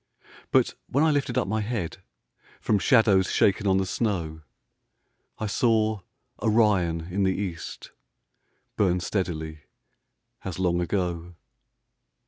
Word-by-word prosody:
But - - +3
when 140 +4 +2
I 160 - +4
lifted 140 -4 0
up - - +1
my 110 +2 0
head 105 -6 -3 0.6
From 105 - +1
shadows 105 -6 +4
shaken 100 +1 +2
on 95 -1 +4
the 95 - +1
snow, 85 -7 -2 1.0
I 110 - -3
saw 110 0 +2 0.4
Orion 105 -7 +2
in 100 - 0
the 95 -1 +2
east 90 -5 -6 0.8
Burn 90 -3 +2
steadily 80 -5 -3 0.8
as 95 -4 -5
long 90 -2 +1
ago. 90 -1 -2
95 Hz, 115 wpm, -26 LUFS, 85-110 Hz, 1.0 s, I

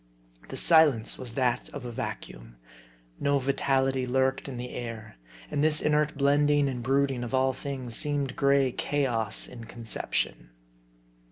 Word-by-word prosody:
The - - -6
silence 150 -9 +4
was 120 -3 -6
that 125 -3 0
of - - -8
a 120 - -5
vacuum. - - -7 0.6
No 140 0 +2
vitality 135 -1 0
lurked 130 +2 0
in 130 - -6
the 125 +1 -6
air. 115 - -7 0.3
And 145 - 0
this 155 0 +3
inert 150 0 +1
blending 145 +1 +3
and 125 -3 -3
brooding 135 0 0
of 120 +2 -3
all 130 0 +2
things 130 -4 -5
seemed 145 -3 0
gray 140 -1 +3
chaos 120 -7 0
in 115 -2 -10
conception. 110 - -2
130 Hz, 145 wpm, -27 LUFS, 120-140 Hz, 0.6 s, silence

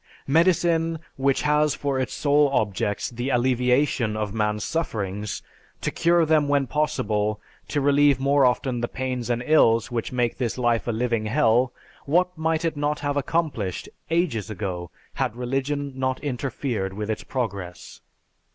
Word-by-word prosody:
Medicine 165 +1 +2 0.2
which 135 0 +1
has 150 0 +2
for 140 -2 -1
its 130 - -2
sole 145 0 +3
objects 105 -4 -1
the 120 +3 -3
alleviation 125 -2 +2
of 105 -2 -3
man's 105 -1 0
sufferings, 105 - -3 0.4
to - - -2
cure 170 0 +3
them 155 -2 +3
when 140 -1 +2
possible, 110 -7 0 0.3
to 145 - -1
relieve 145 -1 +4
more 140 +1 +3
often 125 -1 +1
the 120 - 0
pains 130 -2 -3
and 120 0 0
ills 115 -6 +4
which 115 -2 -2
make 120 -1 -1
this 120 -2 -1
life 120 -2 +1
a - - +1
living 115 -1 -1
hell, 120 0 +3 0.4
what 180 +4 +2
might 160 0 0
it 160 -2 0
not 145 +1 -1
have 145 0 -1
accomplished 140 - -1 0.2
ages 165 - 0
ago 90 -5 -4 0.2
had 125 -4 -2
religion 135 +3 -2
not 130 0 -1
interfered 125 -7 -2
with 105 +2 -3
its 110 - -4
progress? 100 -9 -5
130 Hz, 150 wpm, -24 LUFS, 115-145 Hz, 0.4 s, relieve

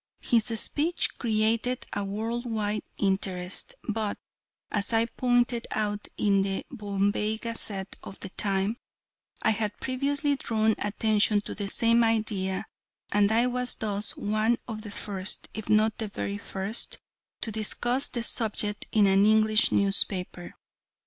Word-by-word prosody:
His 230 -3 +2
speech 325 +9 +1
created 225 +2 +1
a 205 - -1
world 225 +5 -3
wide 215 -2 -1 0.2
interest, 190 -2 -1
but, 215 -1 -1 0.5
as 205 +2 0
I 225 0 +4
pointed 245 0 +1
out 210 -1 -2
in 200 -2 +3
the 195 0 -2
Bombay 205 -1 -1
Gazette 215 -4 -5
of 195 - -9
the 195 - -6
time, 195 +3 -1 0.7
I 220 - +4
had 210 -1 -2
previously 280 +2 0
drawn 220 -3 +1
attention 210 0 +2
to - - -6
the 200 -1 -4
same 230 +2 +4
idea, 215 -4 0 0.5
and 205 0 +3
I 230 +2 +4
was 250 0 0
thus 210 -1 -1
one 215 +3 +1
of 220 -2 -5
the 215 - -8
first, 200 -1 -3
if 220 -1 -7
not 215 +1 +3
the 220 - -2
very 100 - -4
first, 195 - -3 0.4
to 225 - -1
discuss 240 +5 +1
the 235 - -3
subject 210 -3 +1
in 210 -2 +4
an 195 0 +4
English 215 0 +4
newspaper. 195 -3 +2
215 Hz, 140 wpm, -27 LUFS, 200-230 Hz, 0.7 s, I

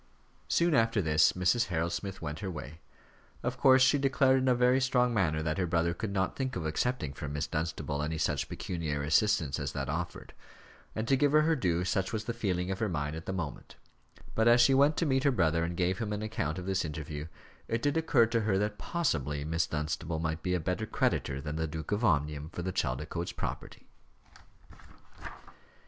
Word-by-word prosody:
Soon 170 -1 +2
after 115 -4 +3
this, 75 -4 +4
Mrs. 90 +6 +2
Harold 85 -1 -1
Smith 95 -3 -5
went 75 -1 -4
her 95 - -4
way. 80 -2 -8 0.6
Of 125 +1 -2
course, 130 0 +6
she 135 +2 +4
declared 135 -1 +3
in 130 - 0
a 125 - +4
very 125 +2 +3
strong 125 -2 +2
manner 80 -7 +1
that 80 +1 -1
her 90 - +1
brother 85 0 +1
could 105 +3 -4
not 95 -1 -1
think 130 -1 -3
of 85 -4 -3
accepting 80 - -1
from 70 -1 -6
Miss 75 0 -1
Dunstable 75 -2 -3
any 80 +2 -2
such - - -1
pecuniary 75 -5 -3
assistance 80 -3 +2
as 70 -2 -3
that 70 -2 -3
offered 85 +4 -4 0.6
and, 110 +1 -2
to 135 - +4
give 145 +2 +2
her 155 0 +6
her 160 +1 +3
due, 90 - 0
such 95 +4 0
was 110 -2 -2
the 115 - -3
feeling 95 -5 -1
of 95 - -3
her 110 -2 0
mind 75 -3 -2
at 80 - -8
the - - -1
moment; 85 -6 -5 0.6
but 110 +1 +2
as 120 +1 +6
she 120 +3 +6
went 140 +3 +4
to 170 - +1
meet 135 -2 +1
her 145 - +4
brother 85 - +2
and 85 0 -3
gave 90 +1 0
him 110 -2 -3
an 105 +1 -3
account 90 -7 -2
of 90 - -5
this 95 0 0
interview, 75 -1 -5 0.4
it 115 0 -2
did 145 0 +1
occur 155 -7 +4
to 115 0 0
her 105 -3 +1
that 105 +1 -1
possibly 75 - -1
Miss 80 +2 0
Dunstable 80 +2 -3
might 80 0 -2
be 90 -1 0
a - - 0
better 90 +6 -2
creditor 70 -7 0
than 75 +2 -5
the 80 0 -1
Duke 80 +2 -6
of 105 +3 0
Omnium 75 -5 +1
for 90 - -6
the 95 +1 -3
Chaldicotes 75 +4 -2
property. - - -6
90 Hz, 210 wpm, -30 LUFS, 80-115 Hz, 0.6 s, course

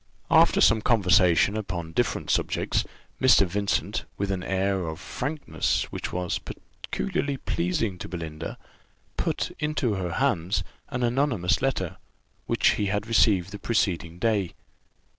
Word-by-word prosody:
After - - +5
some 115 -1 +5
conversation 95 -4 +4
upon 85 -6 -4
different 120 +8 -1
subjects, - - 0 0.4
Mr. 130 -6 +6
Vincent, 100 +3 -1
with 100 0 -1
an 95 -2 -2
air 95 -1 0
of 80 0 -5
frankness 145 +3 -2
which - - -4
was 90 -1 -2
peculiarly 140 -1 -4
pleasing 155 - -1
to - - -6
Belinda, 80 -2 -6 0.6
put - - -2
into 150 -6 0
her 90 -3 -3
hands 105 -9 0 0.3
an 125 0 -2
anonymous 120 -7 +1
letter, 120 -10 -1 0.5
which - - +3
he 105 - 0
had 105 +1 -1
received 100 -4 +3
the 105 - -7
preceding 85 -7 -1
day. 100 -2 0
100 Hz, 130 wpm, -26 LUFS, 90-120 Hz, 0.6 s, Mr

